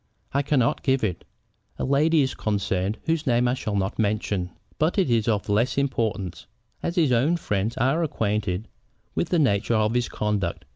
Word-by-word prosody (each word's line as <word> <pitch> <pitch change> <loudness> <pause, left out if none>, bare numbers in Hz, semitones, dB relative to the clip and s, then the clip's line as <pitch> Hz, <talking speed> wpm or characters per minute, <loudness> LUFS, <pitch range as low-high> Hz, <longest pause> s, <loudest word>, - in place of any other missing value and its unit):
"I 140 - +2
cannot 140 -4 +1
give 135 -2 +1
it. 90 -6 -2 0.5
A - - -3
lady 150 +4 +3
is 130 - -1
concerned 100 -1 -1
whose 160 -2 0
name 120 0 +3
I 120 - +2
shall 110 -5 -3
not 95 +1 -1
mention. 100 -3 0 0.3
But 155 +6 +1
it 185 -10 +2
is 115 -2 +2
of 105 -3 0
less 110 +6 +1
importance, 110 -9 -1 0.3
as 170 - -2
his 160 -7 +3
own 135 +9 +3
friends 105 - -2
are 135 +8 +2
acquainted 105 - -1 0.5
with 170 - -1
the 175 - +2
nature 115 -6 +2
of 110 +1 +2
his 120 -1 0
conduct. 100 -7 -2
115 Hz, 180 wpm, -25 LUFS, 105-140 Hz, 0.5 s, lady